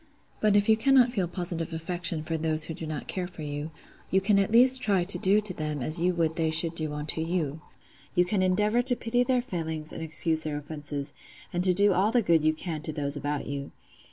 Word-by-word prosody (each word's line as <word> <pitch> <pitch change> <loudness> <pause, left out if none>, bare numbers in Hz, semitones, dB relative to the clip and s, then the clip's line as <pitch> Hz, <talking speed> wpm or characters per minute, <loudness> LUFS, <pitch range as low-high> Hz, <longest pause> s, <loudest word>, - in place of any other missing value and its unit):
But 210 -1 +3
if 205 0 +3
you 220 - +6
cannot 255 +1 +4
feel 195 -7 -1
positive 170 -2 -4
affection 165 -1 -3
for 165 +1 -3
those 155 -1 0
who 165 - -4
do 160 0 -7
not 155 -1 -5
care 185 -2 -3
for 175 -3 -9
you, 145 +1 -5 0.4
you 190 - +3
can 200 +1 +2
at 195 +1 0
least 255 +3 +7
try 200 -6 +1
to 185 - +4
do 195 +3 +4
to 205 -3 -3
them 150 -4 -4
as 155 +6 +2
you 180 +1 +1
would 160 -2 0
they 160 -1 +1
should 160 +1 +2
do 155 -2 -1
unto 150 +2 -1
you: 160 -3 -2 0.5
you 180 - +4
can 190 +1 0
endeavour 210 +5 +2
to 245 0 -1
pity 245 +1 0
their 250 -1 +1
failings 160 -8 -4
and - - -7
excuse 160 0 +1
their 155 -2 -4
offences, 145 -1 -5 0.4
and 175 0 -1
to 180 -1 +4
do 200 +1 +4
all 195 +4 +2
the 240 -1 +2
good 165 -4 +3
you 155 0 +2
can 155 -1 -5
to 155 - -4
those 145 -1 -4
about 145 0 -3
you. 140 0 -5
170 Hz, 235 wpm, -27 LUFS, 155-200 Hz, 0.5 s, least